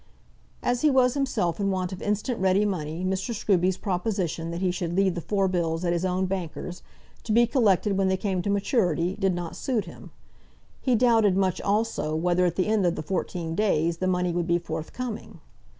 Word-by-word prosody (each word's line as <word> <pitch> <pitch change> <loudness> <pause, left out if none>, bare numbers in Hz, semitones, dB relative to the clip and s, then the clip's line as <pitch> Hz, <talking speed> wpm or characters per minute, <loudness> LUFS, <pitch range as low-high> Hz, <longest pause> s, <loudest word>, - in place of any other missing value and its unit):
As 245 0 0
he 305 - +5
was 255 -2 +4
himself 220 - -1
in 200 -1 +1
want 185 -1 -1
of 185 - -8
instant 210 +4 -1
ready 190 +2 +3
money 170 -3 -3
Mr. 190 +5 -1
Scruby's 185 -3 +1
proposition 180 -4 -2
that 170 +1 -4
he 185 -1 +1
should 175 -2 -3
leave 195 -1 +3
the 170 - -4
four 195 +2 +1
bills 170 -2 -1
at 170 - +1
his 170 +1 -1
own 185 0 0
bankers', 180 -1 -5 0.4
to - - -3
be 235 +2 +5
collected 210 -5 +2
when 195 0 +2
they 190 0 +1
came 190 -2 -1
to 200 - -3
maturity, 190 - +1
did 195 -3 +1
not 175 -2 -5
suit 240 -6 -1
him. - - -11 0.7
He 255 -3 +2
doubted 225 -5 +4
much, 190 -2 +1
also, 205 -6 0
whether 180 +2 +2
at 170 - -2
the 185 - +1
end 215 -2 +2
of 175 - 0
the 155 - -4
fourteen 170 -1 -3
days 170 -4 +1
the 185 - -1
money 180 -1 +1
would 170 0 -1
be 170 0 +3
forthcoming. 175 +5 -6
185 Hz, 200 wpm, -26 LUFS, 175-210 Hz, 0.7 s, he